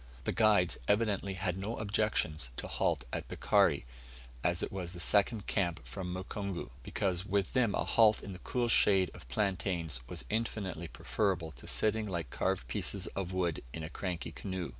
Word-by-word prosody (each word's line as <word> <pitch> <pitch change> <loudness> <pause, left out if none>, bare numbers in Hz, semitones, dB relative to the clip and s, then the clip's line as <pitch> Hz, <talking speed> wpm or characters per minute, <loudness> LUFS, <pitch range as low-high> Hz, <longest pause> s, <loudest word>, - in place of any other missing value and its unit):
The - - 0
guides 105 -6 +4
evidently 100 -2 +1
had 95 0 -1
no 105 +4 -3
objections 100 - 0
to - - -4
halt 80 -7 0
at - - -3
Bikari, - - +3 0.6
as 85 0 +1
it - - -2
was 90 -2 -4
the 85 - -8
second 100 +4 +3
camp 85 -5 0
from 95 -3 -5
Mukungu; 95 - -4
because 90 +6 -1
with 100 -1 0
them 125 -5 +3
a - - +1
halt 110 -2 +4
in 100 - -6
the 90 - -9
cool 120 +3 0
shade 95 -5 +5
of 60 - -12
plaintains 90 - 0
was - - -4
infinitely 105 -6 -2
preferable 90 -2 -1
to - - -12
sitting 110 -1 +1
like 85 -3 -3
carved - - 0
pieces - - -2
of 95 -2 -2
wood 90 -4 0
in 80 - -5
a 80 - -6
cranky 90 -2 -3
canoe. 95 -3 -4
95 Hz, 175 wpm, -33 LUFS, 85-105 Hz, 0.6 s, shade